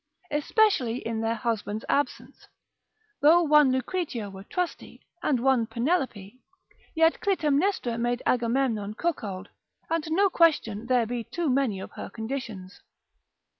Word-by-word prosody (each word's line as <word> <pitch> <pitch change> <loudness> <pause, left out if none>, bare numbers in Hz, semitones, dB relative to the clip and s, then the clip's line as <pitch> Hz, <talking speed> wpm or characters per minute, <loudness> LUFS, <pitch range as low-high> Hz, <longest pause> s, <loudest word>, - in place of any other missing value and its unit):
Especially 295 - +2
in 230 -3 -3
their 225 +1 0
husband's 220 -2 -3
absence: 285 - -2 0.7
though 325 +4 +6
one 300 -3 +5
Lucretia 260 - -2
were 190 0 -10
trusty, 360 - -5 0.2
and 265 -5 +1
one 250 -2 +2
Penelope, 240 - -2 0.5
yet 325 +1 +3
Clytemnestra 305 - +1
made 240 +1 -1
Agamemnon 230 -4 0
cuckold; 205 - -3 0.4
and 330 -1 0
no 390 +5 +3
question 290 - +2
there 250 -2 +3
be 240 +1 -3
too 330 +3 -2
many 250 -7 +1
of - - -8
her - - -8
conditions. 220 -5 -6
250 Hz, 125 wpm, -26 LUFS, 225-305 Hz, 0.7 s, though